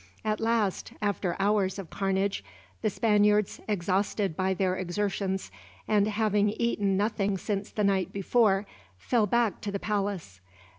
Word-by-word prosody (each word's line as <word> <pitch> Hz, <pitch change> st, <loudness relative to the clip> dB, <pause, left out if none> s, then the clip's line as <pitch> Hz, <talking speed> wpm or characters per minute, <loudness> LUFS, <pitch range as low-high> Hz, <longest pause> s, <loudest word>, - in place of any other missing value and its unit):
At 215 Hz, -1 st, 0 dB
last, 225 Hz, -4 st, 0 dB
after 200 Hz, -4 st, -1 dB
hours 200 Hz, -1 st, +1 dB
of 190 Hz, -5 st, -7 dB
carnage, 195 Hz, -, 0 dB, 0.4 s
the 215 Hz, -, +2 dB
Spaniards, 210 Hz, 0 st, +2 dB
exhausted 195 Hz, -1 st, 0 dB
by 190 Hz, +2 st, 0 dB
their 185 Hz, -1 st, +1 dB
exertions 190 Hz, -, -2 dB, 0.4 s
and 210 Hz, -1 st, +3 dB
having 210 Hz, -1 st, +2 dB
eaten 205 Hz, -3 st, 0 dB
nothing 205 Hz, -1 st, 0 dB
since 200 Hz, +1 st, -3 dB
the 210 Hz, -, -2 dB
night 195 Hz, -2 st, +1 dB
before, 200 Hz, 0 st, +2 dB, 0.3 s
fell 215 Hz, -, +1 dB
back 235 Hz, 0 st, +1 dB
to 205 Hz, -, -3 dB
the 200 Hz, -, -1 dB
palace. 195 Hz, -, -3 dB
200 Hz, 140 wpm, -28 LUFS, 190-210 Hz, 0.4 s, and